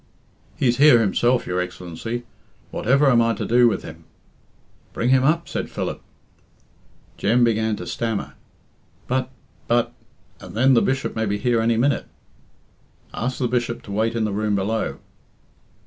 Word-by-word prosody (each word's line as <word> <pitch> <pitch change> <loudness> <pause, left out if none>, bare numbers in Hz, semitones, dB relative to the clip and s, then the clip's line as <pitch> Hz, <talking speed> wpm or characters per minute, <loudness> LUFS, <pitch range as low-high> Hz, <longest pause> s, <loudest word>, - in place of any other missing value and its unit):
"He's 120 -2 +2
here 145 -3 +7
himself, 120 +3 +2
your 90 0 -2
Excellency. 90 +7 -6 0.5
Whatever 140 +5 +2
am 120 -1 +5
I 115 0 +1
to - - -4
do 120 +1 +5
with 115 - -1
him?" 80 +1 -11 0.9
"Bring 120 - 0
him 130 0 +4
up," 165 +4 +1
said - - -4
Philip. - - -4 1.2
Jem 120 +4 +2
began 110 -2 +1
to - - -7
stammer. 115 -3 -3 0.7
"But 130 0 -1 0.4
but 120 0 +1 0.5
and 90 0 -11
then 130 +4 +4
the 115 - +5
Bishop 135 0 -1
may 110 -1 -1
be 100 +1 -1
here 120 0 +1
any 115 0 +2
minute." 140 +4 +1 1.1
"Ask 125 +2 -3
the 125 - 0
Bishop 120 -1 -2
to 100 - -10
wait 110 +3 0
in 115 - 0
the 105 -2 -1
room 105 0 0
below." 105 +3 -1
115 Hz, 155 wpm, -22 LUFS, 110-125 Hz, 1.2 s, here